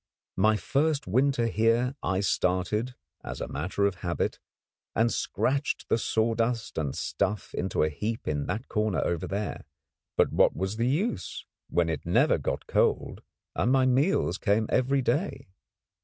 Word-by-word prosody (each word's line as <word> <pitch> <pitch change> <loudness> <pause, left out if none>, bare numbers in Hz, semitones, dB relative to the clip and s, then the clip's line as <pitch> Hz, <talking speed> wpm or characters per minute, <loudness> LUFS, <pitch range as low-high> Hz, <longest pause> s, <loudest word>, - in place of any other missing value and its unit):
My 110 +3 +4
first 145 +4 0
winter 130 +4 +2
here 115 +4 +2
I 95 0 0
started, 100 +5 0 0.3
as - - -6
a - - -3
matter 90 +7 -1
of 100 -2 0
habit, 85 -1 -1 0.6
and 115 +1 +2
scratched 140 +2 -1
the 115 - +3
sawdust 115 -1 0
and 70 -4 -2
stuff 105 +2 -2
into 95 -3 0
a 80 - +2
heap 105 +9 -4
in 75 -2 -1
that 105 +7 -3
corner 105 -3 0
over 85 +1 -1
there. 100 +3 -3 0.5
But - - +3
what - - +4
was 95 +5 -2
the 115 +1 +1
use, 140 - -1 0.2
when 85 -1 +2
it 80 -3 -2
never - - +3
got - - -3
cold - - +1 0.3
and 125 - +1
my 130 -1 +4
meals 130 - +2
came 110 +2 +2
every 130 +1 +2
day? 140 - -1
110 Hz, 155 wpm, -28 LUFS, 95-125 Hz, 0.6 s, My